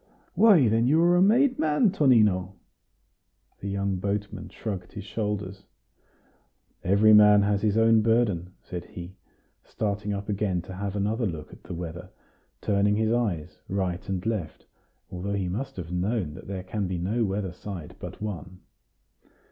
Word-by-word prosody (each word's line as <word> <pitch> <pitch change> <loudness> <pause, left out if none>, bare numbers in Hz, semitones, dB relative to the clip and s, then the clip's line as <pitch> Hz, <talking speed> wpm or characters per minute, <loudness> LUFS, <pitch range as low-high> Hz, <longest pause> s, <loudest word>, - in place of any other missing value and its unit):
"Why, 195 - +6
then 115 +2 +2
you 155 +4 +4
are 175 +1 +5
a 175 - +4
made 250 +7 +4
man, 160 +7 +3
Tonino!" 105 - +3 1.0
The 100 - -5
young 100 -1 -1
boatman 100 +2 -3
shrugged 95 -5 -6
his 105 - -7
shoulders. 105 -2 -4 1.2
"Every 100 +4 +5
man 105 -1 +7
has 100 0 +1
his 105 0 +1
own 115 0 +5
burden," 105 -6 +1
said 90 -1 -6
he, 90 +2 -10 0.5
starting 105 -1 -3
up 100 0 -4
again 100 -4 -1
to 95 - -9
have 100 +1 -4
another 105 +3 0
look 80 -4 -7
at - - -14
the - - -7
weather, 85 +1 -7 0.5
turning 100 0 +2
his 110 +1 +1
eyes 100 -10 -1
right 95 -1 -2
and 95 0 -3
left, 105 -9 -3 0.5
although 95 +3 -4
he 95 -2 -1
must 135 +9 -4
have 85 -2 -7
known 90 -2 -1
that 90 - -11
there 95 -1 -5
can 100 +1 -3
be 90 -1 -3
no 105 +7 0
weather 95 -3 -2
side 90 -4 -8
but - - -8
one. 95 -3 -6
100 Hz, 160 wpm, -26 LUFS, 90-110 Hz, 1.2 s, man